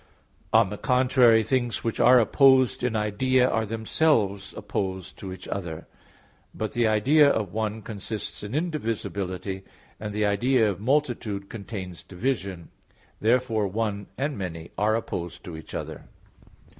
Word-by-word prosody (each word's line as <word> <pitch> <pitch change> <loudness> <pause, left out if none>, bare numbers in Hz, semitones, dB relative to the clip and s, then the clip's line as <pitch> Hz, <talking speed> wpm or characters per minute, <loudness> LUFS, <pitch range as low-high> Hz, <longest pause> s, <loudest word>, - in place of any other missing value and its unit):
On 110 -3 +4
the 105 - -6
contrary, 125 -3 +4
Things 120 -1 -1
which 115 - -2
are 125 +2 +7
opposed 130 +1 +4
in 125 -2 0
idea, 125 +5 +2
are 110 -2 0
themselves 110 -3 +1
opposed 95 -3 -4
to 95 - -6
each 95 0 -9
other. 85 -5 -5 0.7
But 110 -1 -3
the 120 -1 +2
idea 140 +8 +5
of 105 -8 -1
"one" 110 0 -2
consists 110 0 -6
in 105 +5 -5
indivisibility; 100 - -3 0.4
and 105 0 -5
the 105 +1 0
idea 115 +3 +3
of 95 - -7
"multitude" 115 -5 -1
contains 95 -5 -7
division. 95 -4 -3 0.5
Therefore 115 -2 +2
"one" 100 0 -2
and 145 +2 -1
"many" 85 -3 -6
are 105 +2 +2
opposed 90 -6 -4
to 85 - -7
each 80 - -9
other. - - -6
110 Hz, 140 wpm, -26 LUFS, 100-125 Hz, 0.7 s, are